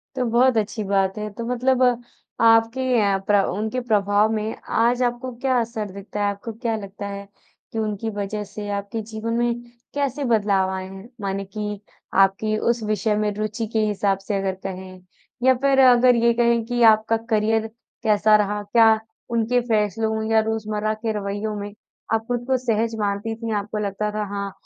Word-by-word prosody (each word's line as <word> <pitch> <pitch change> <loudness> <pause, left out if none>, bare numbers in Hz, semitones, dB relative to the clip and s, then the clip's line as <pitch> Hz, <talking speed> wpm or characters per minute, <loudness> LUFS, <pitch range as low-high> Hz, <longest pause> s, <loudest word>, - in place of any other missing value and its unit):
तो 255 - 0
बहुत 245 +1 +4
अच्छी 215 +1 -1
बात 195 0 +1
है, 210 0 -3
तो 230 +3 -7
मतलब 250 +1 +1 0.6
आपके 225 +2 +4 0.2
अ, 200 -1 +2
प्र 205 -2 +5
उनके 215 +6 -2
प्रभाव 210 -1 +2
में 215 0 -2 0.2
आज 240 +2 +3
आपको 245 +1 -2
क्या 260 -2 +2
असर 220 -3 -3
दिखता 200 +2 -7
है, - - +2
आपको 200 +3 -7
क्या 230 0 -2
लगता 200 0 -7
है, 200 0 -7 0.4
कि 225 - -3
उनकी 215 0 -2
वजह 205 +1 -3
से 205 +1 -8
आपके 200 +2 -3
जीवन 220 +1 -5
में 240 0 +2 0.4
कैसे 285 0 -1
बदलाव 205 -5 +2
आए 190 0 -4
हैं? 195 +4 -11
माने 195 0 -2
कि 210 +1 -5 0.4
आपकी 215 +3 0
उस 235 +1 0
विषय 210 0 0
में 210 0 0
रुचि 215 +2 -3
के 220 - +2
हिसाब 200 -2 +1
से 210 - 0
अगर 195 -1 -1
कहें 185 -1 -7 0.4
या 260 0 +6
फिर 275 -1 +3
अगर 250 -1 +6
ये 235 0 +3
कहें 235 -1 +2
कि 240 0 -2
आपका 220 +1 +1
करियर 220 0 +2 0.4
कैसा 215 -1 +4
रहा? 210 0 +1
क्या 220 +1 +4 0.3
उनके 235 +2 +2
फैसलों 220 0 0
या 220 - +5
रोज़मर्रा 215 -1 -2
के 220 +1 -3
रवैयों 205 +2 -3
में, 205 0 -6 0.4
आप 225 0 +1
खुद 245 0 -2
को 260 -1 +2
सहज 230 -2 0
मानती 205 +2 -1
थी। 225 0 -5
आपको 210 +1 -3
लगता 205 +2 -2
था 210 0 -2
हाँ, 200 -1 -3
215 Hz, 180 wpm, -23 LUFS, 205-230 Hz, 0.6 s, या